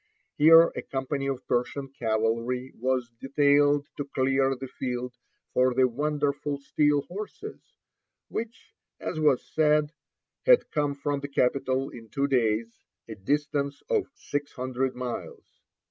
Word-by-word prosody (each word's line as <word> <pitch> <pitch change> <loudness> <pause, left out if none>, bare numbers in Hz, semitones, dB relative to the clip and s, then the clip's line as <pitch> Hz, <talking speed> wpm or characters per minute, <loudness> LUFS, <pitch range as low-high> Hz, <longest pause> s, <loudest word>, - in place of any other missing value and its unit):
Here 165 +2 +8
a - - -3
company 135 +1 -3
of 135 -2 -3
Persian 135 +3 -1
cavalry 115 +1 -1
was 125 -1 -1
detailed 145 +1 +3
to 145 - -3
clear 135 0 +1
the 135 +1 -7
field 125 -1 -4 0.4
for 125 -1 +3
the 130 0 +5
"wonderful 145 +2 -1
steel 145 0 +1
horses," 215 - -9 0.5
which, 230 0 -6 0.3
as 155 - -4
was 150 -4 +3
said, 150 -1 +3 0.6
had - - +5
come 145 -2 0
from 140 0 -2
the 140 - -5
capital 135 0 0
in 115 -2 -11
two 140 +6 0
days, 115 -3 0 0.3
a 115 - -6
distance 140 +6 -1
of 435 -6 +2
six 145 0 -4
hundred 130 0 -2
miles. 125 -1 -6
140 Hz, 130 wpm, -27 LUFS, 125-145 Hz, 0.6 s, Here